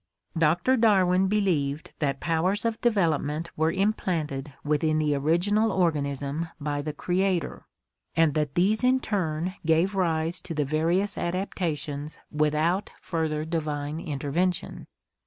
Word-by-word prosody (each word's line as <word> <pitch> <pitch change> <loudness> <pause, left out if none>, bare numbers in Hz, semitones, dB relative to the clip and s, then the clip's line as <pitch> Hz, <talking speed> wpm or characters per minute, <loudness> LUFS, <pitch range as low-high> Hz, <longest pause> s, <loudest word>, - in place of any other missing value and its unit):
Doctor 165 +11 +3
Darwin 190 -4 +4
believed 170 -8 0
that 140 -3 0
powers 180 +6 0
of 230 -1 -1
development 165 -7 +1
were 160 +1 +2
im 195 +4 +2
planted 150 -8 -3
within 155 +1 +1
the 150 -1 +2
original 175 +10 +2
organism 150 -3 -1
by 145 -1 -2
the 150 +1 -3
Creator, 180 +3 -1 0.5
and 165 -3 +4
that 150 -2 -1
these 205 +6 +2
in 255 +1 +4
turn 180 -6 -2
gave 165 +4 +2
rise 165 -2 0
to 165 - -6
the 150 -1 +1
various 170 +7 0
adaptations 155 -5 -3
without 155 +5 +1
further 155 -3 -2
divine 150 -2 -3
intervention. 165 +3 -2
165 Hz, 125 wpm, -26 LUFS, 150-185 Hz, 0.5 s, Darwin